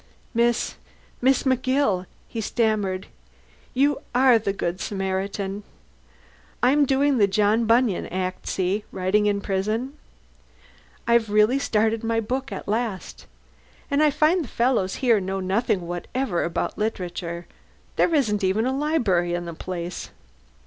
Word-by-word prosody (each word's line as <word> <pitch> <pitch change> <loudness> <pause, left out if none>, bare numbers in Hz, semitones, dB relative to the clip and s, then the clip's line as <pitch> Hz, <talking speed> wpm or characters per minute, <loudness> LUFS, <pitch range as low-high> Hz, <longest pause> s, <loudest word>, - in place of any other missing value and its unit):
"Miss 235 0 +1 0.4
Miss 260 +1 +3
McGill," 255 -7 +1 0.2
he 225 - -4
stammered. 210 -4 0 0.7
"You 280 +2 +2
are 250 -2 +6
the 200 -2 -1
good 185 -2 -3
Samaritan. 195 0 -3 1.0
I'm 280 +3 +4
doing 275 0 +2
the 200 - +5
John 210 +3 +2
Bunyan 230 -3 +2
act, 185 0 -4
see? 190 +3 0
Writing 195 +3 +1
in 200 -1 +1
prison. 215 +8 -2 1.1
I've 235 -2 +3
really 215 +6 +4
started 220 -3 +1
my 225 0 +1
book 260 +5 -3
at - - -6
last. 215 -3 -3 0.6
And 280 +1 +3
I 305 - +5
find 310 +4 +2
the - - -8
fellows 235 -6 +1
here 230 -4 +5
know 190 0 -3
nothing 190 +1 0
whatever 175 +4 -2
about 170 - -2
literature. 175 -5 -3 0.5
There 335 - +3
isn't 210 -8 +1
even 195 +5 +2
a 260 +1 0
library 220 - +1
in 175 0 -4
the 170 - -6
place." 175 +1 -5
215 Hz, 135 wpm, -24 LUFS, 190-255 Hz, 1.1 s, are